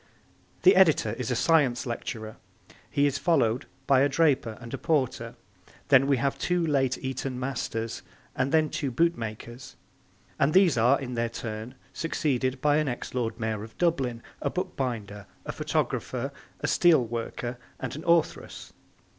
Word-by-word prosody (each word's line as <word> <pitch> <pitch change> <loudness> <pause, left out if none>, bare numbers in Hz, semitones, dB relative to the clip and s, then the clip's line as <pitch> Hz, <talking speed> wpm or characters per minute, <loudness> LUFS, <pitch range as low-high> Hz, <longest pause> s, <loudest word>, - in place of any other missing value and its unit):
The 380 +3 +7
editor - - +4
is - - -4
a - - +1
'Science 145 -7 +3
lecturer'; 110 -2 -5 0.5
he 140 - +2
is 145 0 0
followed 125 -7 +2 0.2
by 135 -1 +4
a 140 - +4
draper 135 -7 +2
and 115 -1 -10
a - - -3
porter; 130 -7 -1 0.5
then 135 -1 +6
we 140 -2 +3
have 135 +2 -1
two 180 -1 +1
late 135 -4 +1
Eton 130 -1 -4
masters 115 -3 -3 0.3
and 130 +1 0
then 155 -2 +3
two 135 - -2
bootmakers; 120 -5 -2 0.6
and 155 - +2
these 185 -6 +6
are, 120 +4 +4
in 125 -2 -5
their 115 -1 -1
turn, 115 +2 -6 0.2
succeeded 130 -5 -1
by 150 0 +3
an 155 -1 +1
ex 120 -2 -4
Lord 115 -2 -2
Mayor 110 -2 -2
of 110 - -12
Dublin, 135 -9 0 0.2
a - - 0
bookbinder, 120 - -4 0.2
a - - -3
photographer, - - -2 0.3
a - - -1
steel 160 -8 +4
worker 120 +1 -4 0.2
and - - -4
an 155 - -7
authoress. 170 -1 0
130 Hz, 155 wpm, -27 LUFS, 115-150 Hz, 0.6 s, The